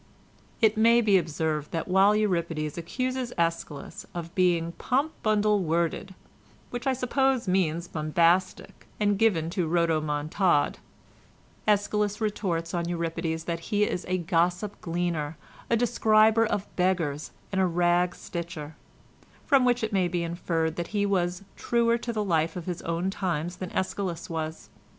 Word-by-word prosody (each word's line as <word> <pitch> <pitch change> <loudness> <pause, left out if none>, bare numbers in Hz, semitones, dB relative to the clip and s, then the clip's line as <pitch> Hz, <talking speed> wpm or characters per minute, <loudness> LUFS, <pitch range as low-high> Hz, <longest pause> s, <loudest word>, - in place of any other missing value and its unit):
"It 220 -1 +4
may 230 +2 +6
be 205 -5 +4
observed 155 -2 -2
that 165 - -2
while 195 +3 +5
Euripides 170 -7 -1
accuses 255 +8 -3
Æschylus 165 -4 -2
of 170 -1 -5
being 175 -3 +2
'pomp 265 - 0
bundle 210 -1 +2
worded,' 170 +3 -1 0.6
which 245 +2 -4
I 265 - +3
suppose 260 -1 +1
means 175 -2 +1
bombastic 170 +4 0
and 205 -1 +2
given 170 -8 +2
to 175 -2 -1
rodomontade, 155 0 +1 0.9
Æschylus 210 0 +1
retorts 185 -6 -2
on 170 -1 -1
Euripides 165 -1 -2
that 170 0 -3
he 210 -1 +2
is 180 - -1
a 185 +1 0
'gossip 180 +3 0
gleaner, 165 -3 -2 0.3
a 230 - +3
describer 220 -1 +4
of 205 -2 -1
beggars, 170 -6 0 0.2
and 190 -1 +1
a 185 - +3
rag 175 +1 +2
stitcher,' 165 -3 -6 0.7
from 275 -4 +4
which 245 -1 +2
it 220 - -2
may 185 -2 +2
be 175 0 -1
inferred 165 -1 -2
that 170 -1 -2
he 205 - +2
was 180 -2 0
truer 235 0 +1
to 235 - -4
the 215 -2 -1
life 165 -4 +1
of 175 -2 -6
his 180 -2 -4
own 170 +3 -1
times 175 -2 -2
than 185 - -5
Æschylus 185 -3 -3
was. 155 -9 -5
180 Hz, 145 wpm, -27 LUFS, 165-210 Hz, 0.9 s, may